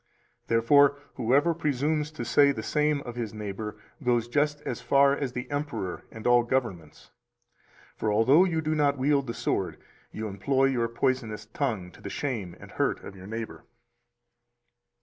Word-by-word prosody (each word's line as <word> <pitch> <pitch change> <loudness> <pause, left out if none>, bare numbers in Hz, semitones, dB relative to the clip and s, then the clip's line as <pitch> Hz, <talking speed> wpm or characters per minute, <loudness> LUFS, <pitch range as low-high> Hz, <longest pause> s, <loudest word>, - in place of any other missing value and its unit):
Therefore, 140 +5 +5 0.2
whoever 140 +9 +2
presumes 150 0 0
to 120 -6 -5
say 140 +5 +5
the 110 -5 -5
same 150 -1 +1
of 120 -3 -8
his 115 -3 -4
neighbor 105 0 -5 0.3
goes 120 -2 +2
just 150 +3 +1
as - - -4
far 140 0 +4
as 135 -4 -3
the 125 0 -4
emperor 145 -11 -3
and 110 - -11
all 120 0 +6
governments. 120 -11 -3 0.9
For 110 - 0
although 125 - +5
you 165 -4 0
do 155 0 -1
not 145 -2 +2
wield 140 0 +2
the 115 - -4
sword, 85 -4 -1 0.3
you 110 0 -4
employ 130 +7 +1
your 120 -2 +1
poisonous 115 -3 -1
tongue 110 -6 -3
to - - -17
the - - -6
shame 110 -11 -3
and - - -12
hurt - - -1
of 100 - -9
your 95 0 -11
neighbor. 110 +1 -6
125 Hz, 165 wpm, -27 LUFS, 110-145 Hz, 0.9 s, all